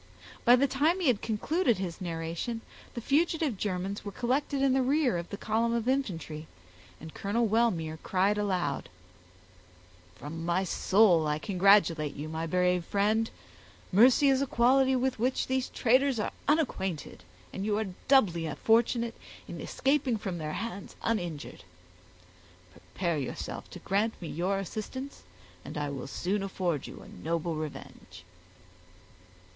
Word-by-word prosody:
By 245 0 +8
the 260 +2 +3
time 295 +7 +2
he 340 -7 +2
had 230 -5 +1
concluded 240 - +1
his 185 0 -5
narration, 170 +7 -3 0.3
the 235 - -4
fugitive 305 0 +1
Germans 190 0 -3
were 205 - -5
collected 265 +6 -1
in 270 -1 +4
the 265 - +3
rear 270 - +2
of 170 0 -4
the 200 - -5
column 225 +2 0
of 235 0 -1
infantry, 170 - -2 0.5
and 160 0 -10
Colonel 220 +4 0
Wellmere 185 -8 +1
cried 195 +2 +1
aloud,— 180 -9 -1 1.3
"From 160 - -7
my 175 +3 +1
soul 185 -3 +4
I 150 0 0
congratulate 180 -4 +3
you, 150 +2 -5
my 160 +1 -3
brave 180 +1 +2
friend; 215 +4 +1 0.6
mercy 250 +8 +6
is 270 0 +3
a 275 - 0
quality 260 +2 +4
with 255 -1 0
which 255 +3 +1
these 260 0 -1
traitors 255 +1 +2
are 210 - -1 0.2
unacquainted, 210 - -1 0.3
and 190 - -4
you 210 0 0
are 220 - 0 0.2
doubly 175 - +3
fortunate 230 +1 +2 0.3
in - - -7
escaping 270 -4 +1
from 190 -5 -4
their 155 -1 -4
hands 225 -4 -5
uninjured. 175 -10 -3 1.1
Prepare 145 - -3
yourself 130 - -5
to - - -9
grant 210 +4 -1
me 170 - -6
your 185 +5 -1
assistance 220 +8 -6 0.4
and - - -7
I 145 -1 -2
will 135 -2 -5
soon 195 +8 -2
afford 180 -6 -2
you - - -10
a - - -13
noble 165 +1 -3
revenge." 155 -10 -8
205 Hz, 145 wpm, -29 LUFS, 170-250 Hz, 1.3 s, By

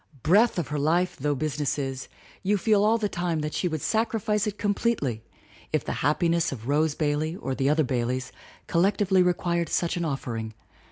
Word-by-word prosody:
Breath 210 +8 +4
of 170 - -2
her 150 0 -2
life 170 +5 +1
though 145 0 0
business 150 0 -1
is, 135 -2 -4 0.3
you 205 +2 +1
feel 205 +1 +3
all 220 +2 +4
the 215 -2 0
time 175 -4 -2
that 150 0 -3
she 180 - 0
would 160 -3 -3
sacrifice 220 -1 0
it 210 -1 -3
completely 205 - -1 0.5
if - - 0
the - - -3
happiness 170 +3 +2
of 120 -3 -7
Rose 150 +1 +2
Bailey 155 +2 -1
or 135 -8 -4
the 135 +1 +1
other 155 +1 +3
Baileys 130 0 -2 0.4
collec 180 +4 +2
tively 190 -2 +3
required 175 -1 0
such 170 0 0
an 175 - -1
offering. 115 -7 -4
160 Hz, 185 wpm, -26 LUFS, 140-195 Hz, 0.5 s, Breath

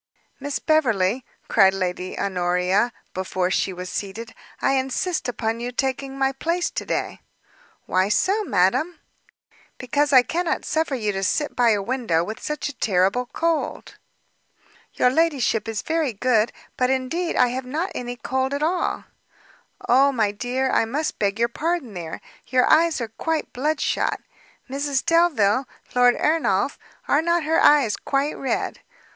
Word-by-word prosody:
"Miss 285 0 -3
Beverley," 245 - +1 0.2
cried 190 0 +4
Lady 185 -1 -3
Honoria, 180 +4 +1 0.2
before 185 0 -1
she 190 - +1
was 180 0 -7
seated, 205 +5 -5 0.3
"I - - +2
insist 270 +4 -1
upon 225 -1 -2
your 240 +1 -4
taking 270 +1 -2
my 270 0 +2
place 335 +6 -1
to - - -5
day." - - -3 0.6
"Why 185 +2 +1
so, 390 - +2
madam?" 310 - +1 0.8
"Because 285 +3 0
I 260 -2 +7
cannot 345 +5 -2
suffer 315 -3 0
you 215 -4 -1
to 195 -1 -3
sit 295 +10 -1
by 245 -1 +4
a 205 -3 +2
window 230 -9 0
with 215 +5 -6
such 300 0 -3
a 290 - -5
terrible 200 +4 +1
cold." 330 +4 -2 1.0
"Your 250 - +3
ladyship 275 -7 +1
is 220 -1 -3
very 320 -6 0
good, 225 0 +2 0.3
but 250 0 +2
indeed 265 +7 -1
I 250 - +4
have 255 +1 -4
not 325 +9 -2
any 245 0 -5
cold 260 +3 -2
at 290 - -2
all." 350 +3 0 0.8
"O 270 +3 +5
my 220 -6 +1
dear, 250 +5 -1
I - - +3
must 285 +7 -3
beg 200 0 0
your 235 +1 +2
pardon 300 -1 -2
there; 170 -3 -6 0.3
your 250 0 +3
eyes 330 -1 +4
are 230 - -2
quite 320 -1 -2
bloodshot; 295 +4 0 0.5
Mrs 275 0 -1
Delvile, 275 -9 +3 0.3
Lord 245 0 +5
Ernolf, 280 -8 +1 0.3
are 290 - +3
not 340 0 +1
her 320 +2 +2
eyes 280 -8 +5
quite 280 +2 -1
red? 270 - -2
255 Hz, 150 wpm, -23 LUFS, 210-300 Hz, 1.0 s, I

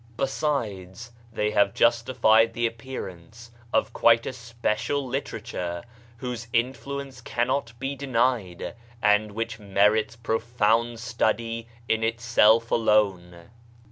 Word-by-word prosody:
\ 115 - -26
98 120 - -2 0.2
BAHAISM 115 +2 +3
the 120 0 0
appearance 115 -2 -7 0.2
of - - +1
quite 115 0 +4
a - - -3
special 120 +3 -2
literature 110 -9 -4 0.3
whose 120 -1 -5
influence 130 +2 -2
cannot 120 0 -1
be 135 +3 -3
denied, 125 -8 -1 0.3
and 105 -1 +2
which 115 +1 -4
merits 105 +2 +2
profound 115 0 0
study 115 -1 -1 0.2
in 110 0 +1
itself 115 0 +3
alone. 95 -6 +1
115 Hz, 100 wpm, -25 LUFS, 105-120 Hz, 0.3 s, quite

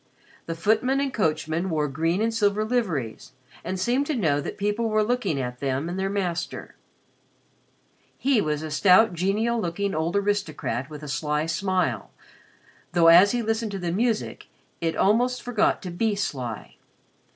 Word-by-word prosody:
The 165 - -3
footman 225 +9 +1
and 275 -2 -1
coachman 160 -1 -1
wore 155 -3 0
green 165 +8 0
and 225 0 0
silver 210 -1 +1
liveries 180 - -2 0.3
and 185 +2 -4
seemed 250 +8 +1
to 310 - -1
know 155 - +1
that - - -6
people 210 +3 -1
were 215 0 +2
looking 210 - -1
at 125 -1 -4
them 135 +2 -1
and 180 +2 -4
their 195 0 -1
master. 180 -4 -3 1.4
He 265 -5 +2
was 150 -2 -2
a 155 - -5
stout, 185 +6 +5
genial 210 +7 0
looking 195 +3 -2
old 160 +3 -1
aristocrat 195 -10 -1
with 150 -1 -9
a - - -6
sly 150 +3 -1
smile, 185 +3 -1 0.8
though, 170 -1 +6
as 180 +4 +8
he 240 -1 -1
listened 220 -1 -1
to - - -2
the 175 -2 -3
music, 225 +4 -1 0.3
it 165 -1 -1
almost 245 +5 +2
forgot 230 -4 +1
to 180 - -5
be 210 +4 0
sly. 130 - -4
190 Hz, 160 wpm, -25 LUFS, 160-220 Hz, 1.4 s, as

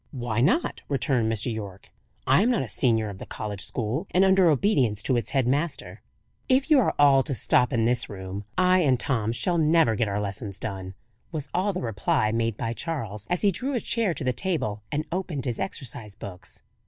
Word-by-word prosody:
"Why 120 -4 -2
not?" 190 - +1
returned 125 -4 +1
Mr. 115 +2 -1
Yorke. 100 -3 -8 0.4
"I 135 +7 +4
am 230 - +3
not 240 - +1
a - - -6
senior 110 0 +1
of 95 -2 -9
the - - -7
college 105 -3 -2
school, 115 - -1
and 185 +2 +3
under 190 -2 +5
obedience 130 - +1
to 130 - +1
its 120 - -1
head 135 -3 +1
master." 145 +4 -2 0.5
"If 265 +4 +2
you 295 - +7
are 240 - +1
all 140 -2 +6
to 135 0 -2
stop 125 +3 +3
in 115 -3 +1
this 120 +1 +2
room, 95 0 -6
I 185 0 +4
and 135 -8 +2
Tom 115 -5 0
shall 170 +8 0
never 155 -6 +4
get 110 +1 0
our 100 0 -2
lessons 100 0 -5
done," 95 -3 -5 0.4
was 150 -4 -4
all 190 +3 +1
the 185 - -4
reply 110 -1 0
made 115 -1 -1
by 115 -2 -2
Charles, 115 - -4
as 180 +2 0
he 200 - +4
drew 265 +9 -2
a - - +1
chair 210 -4 0
to - - -5
the 130 -1 0
table 125 - -1
and 150 +1 -1
opened 170 -7 -3
his 120 -3 -3
exercise 115 - -5
books. 90 -2 -10
125 Hz, 210 wpm, -25 LUFS, 110-170 Hz, 0.5 s, you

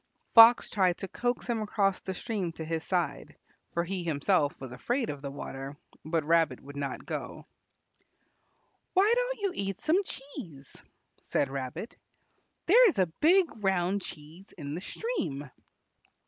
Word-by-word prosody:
Fox 230 +1 +9
tried 185 -3 +2
to 195 - -5
coax 245 +5 -2
him 235 -2 -1
across 200 -2 +1
the 190 - -5
stream 205 -5 -3
to 160 - -6
his 160 0 -2
side, 180 -3 -2 0.4
for 170 - +2
he 185 +1 -3
himself 160 0 +1
was 130 -2 -8
afraid 240 - -1
of 145 -1 -8
the 140 - -5
water, 135 0 -7 0.3
but 160 0 0
Rabbit 160 -4 +2
would 140 +1 -12
not 140 -1 -4
go. - - -5 1.5
"Why 405 +5 +5
don't - - -1
you 400 -2 0
eat 195 -1 -3
some 335 +6 +2
cheese?" 240 - -10 0.5
said 140 - 0
Rabbit; 135 - -5 0.7
"there 470 +6 +7
is - - -3
a 180 -4 +1
big 360 +4 +6 0.2
round 190 +1 +1
cheese 165 +4 -11
in 145 -3 -5
the 170 - -4
stream." 160 - -4
180 Hz, 150 wpm, -29 LUFS, 150-235 Hz, 1.5 s, Fox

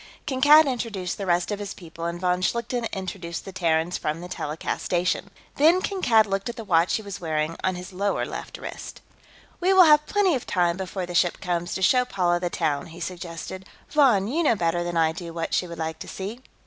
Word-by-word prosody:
Kankad 290 +3 +6
introduced 225 -9 -3
the 195 - -4
rest 175 +2 +1
of 205 - -2
his 205 -1 -5
people, 165 -1 -8
and 170 0 -3
von 180 0 +1
Schlichten 235 +3 -1
introduced 180 -3 -5
the 195 - -7
Terrans 170 -1 0
from 155 +2 -2
the 175 - -7
telecast 155 -3 -4
station. 180 0 0 0.3
Then 325 +5 +5
Kankad 300 - +3
looked 195 +1 -2
at 235 - -5
the 225 - -7
watch 170 -3 +3
he 220 - -3
was 200 -3 -7
wearing 155 -1 -1
on 185 -1 +1
his 180 +1 -8
lower 200 +2 0
left - - -7
wrist. - - -8 0.6
"We 370 +2 +3
will 380 -1 +9
have 300 -2 +5
plenty 405 -4 +2
of 255 - -3
time, 175 -2 +2
before 190 0 -4
the 175 - -7
ship 175 0 +2
comes, 175 -1 -2
to 190 - -2
show 250 +5 +5
Paula 175 -7 0
the 175 0 -2
town," 155 -5 -1
he 165 +1 -11
suggested. 175 +1 -6 0.3
"Von, 245 -10 +4
you 300 +9 0
know 290 -8 +3
better 175 -2 0
than 175 -1 -3
I 160 -1 +3
do 170 0 -8
what 165 -1 -3
she 180 - +1
would 170 -1 -8
like 160 0 -4
to - - -8
see." 200 +5 -6
185 Hz, 220 wpm, -25 LUFS, 170-230 Hz, 0.6 s, will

